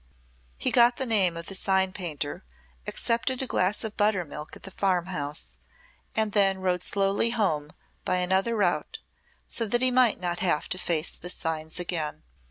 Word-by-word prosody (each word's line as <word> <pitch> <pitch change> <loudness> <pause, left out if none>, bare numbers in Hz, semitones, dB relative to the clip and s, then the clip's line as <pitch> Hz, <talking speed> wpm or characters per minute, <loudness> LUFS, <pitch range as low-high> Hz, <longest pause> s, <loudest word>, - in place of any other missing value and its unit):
He - - 0
got 240 0 +5
the 265 - -2
name 195 -8 +3
of 170 - -6
the 195 - -5
sign 190 0 +2
painter, 155 - -4 0.4
accepted 240 +2 0
a 265 - 0
glass 200 -4 0
of 220 -1 -4
buttermilk 180 -8 -1
at - - -12
the 195 - -7
farm 185 -3 0
house, 145 - -2 0.6
and 220 -1 +1
then 195 -2 +3
rode 180 -2 -1
slowly 200 +4 +1
home 175 -11 0 0.3
by 185 - +1
another 190 +5 +1
route, 190 -5 0 0.5
so 230 - 0
that 240 +4 +1
he 255 - +4
might 250 -3 +4
not 175 -1 -2
have 175 -5 +1
to 185 - 0
face 170 -3 +2
the 175 - -7
signs 160 -1 -3
again. 170 -4 -3
190 Hz, 175 wpm, -26 LUFS, 170-215 Hz, 0.6 s, got